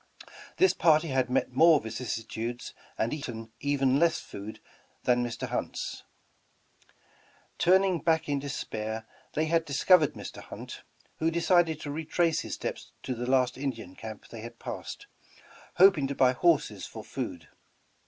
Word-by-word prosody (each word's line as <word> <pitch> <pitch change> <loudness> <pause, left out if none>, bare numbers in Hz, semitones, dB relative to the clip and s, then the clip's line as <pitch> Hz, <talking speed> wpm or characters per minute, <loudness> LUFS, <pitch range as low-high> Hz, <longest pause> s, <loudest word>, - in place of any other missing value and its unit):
This 375 - +5
party 160 -1 +4
had 130 -2 +1
met 130 0 +1
more 160 +4 +6
vicissitudes 115 0 -5 0.2
and 115 - 0
eaten 115 -7 -6
even 140 -1 +2
less 170 0 +3
food 100 +2 -9 0.4
that 125 - +4
Mr. 120 -1 -2
Hunt's. - - -3 1.6
Turning 185 0 +4
back 160 +1 +1
in 145 -1 0
despair, 110 -5 -4 0.3
they 155 - +1
had 165 +1 +2
discovered 155 +2 +4
Mr. - - -8
Hunt, - - -9 0.4
who 160 - +1
decided 170 -1 +3
to 145 - -5
retrace 160 +2 +1
his - - -4
steps - - -6
to 130 - -2
the 125 +1 -4
last 130 -1 +2
In 140 0 0
dian 110 -7 -8
camp 110 -2 -9
they 115 - -8
had 115 +1 -9
passed, - - -7 0.7
hoping 180 -7 +6
to 140 - -4
buy 130 -1 +4
horses 165 +3 +1
for - - -9
food. - - -5
140 Hz, 145 wpm, -29 LUFS, 120-160 Hz, 1.6 s, more